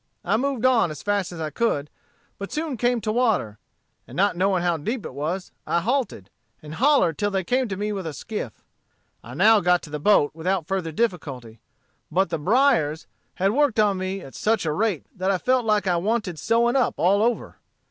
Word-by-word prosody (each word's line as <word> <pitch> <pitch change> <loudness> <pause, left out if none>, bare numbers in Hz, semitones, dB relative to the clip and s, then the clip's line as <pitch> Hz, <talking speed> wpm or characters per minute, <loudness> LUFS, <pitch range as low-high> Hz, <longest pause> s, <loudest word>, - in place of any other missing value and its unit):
I 195 +5 +2
moved 260 0 -1
on 245 -8 +4
as 155 -2 -8
fast 205 -3 0
as 175 - -8
I 155 -1 -3
could, 150 -7 0 0.5
but 200 - -6
soon 310 -3 -2
came 245 0 +1
to 215 +1 -1
water; 220 - 0 0.5
and - - -11
not 200 0 +2
knowing 185 0 +1
how 175 -2 +1
deep 215 - -4
it - - -7
was, 165 +7 -4 0.2
I 170 - +2
halted, 225 - -2 0.3
and 150 0 -10
hollered 260 - +3
till 205 - +1
they 190 -2 -1
came 255 +7 0
to 190 -3 -4
me 210 +1 -2
with 195 -4 -4
a 155 - -5
skiff. 220 -2 -6 0.6
I - - -10
now 220 0 +6
got 180 -2 +2
to 150 - -11
the 150 - -4
boat 150 -4 +4
without 175 +2 -1
further 180 -2 -2
difficulty. 140 - -3 0.5
But 190 +4 +1
the 165 - -1
briers 175 - +2 0.3
had 195 +2 +1
worked 270 -2 +2
on 205 -3 +3
me 190 +1 -3
at 135 - -11
such 215 -4 0
a 155 - 0
rate 205 -4 -1
that 185 0 -1
I 195 - +2
felt 255 +4 +1
like 210 -2 +2
I 180 -2 +2
wanted 200 -3 -1
sewing 235 - +2
up 260 -3 +2
all 195 +4 +3
over. 235 +1 -1
195 Hz, 210 wpm, -24 LUFS, 165-230 Hz, 0.6 s, now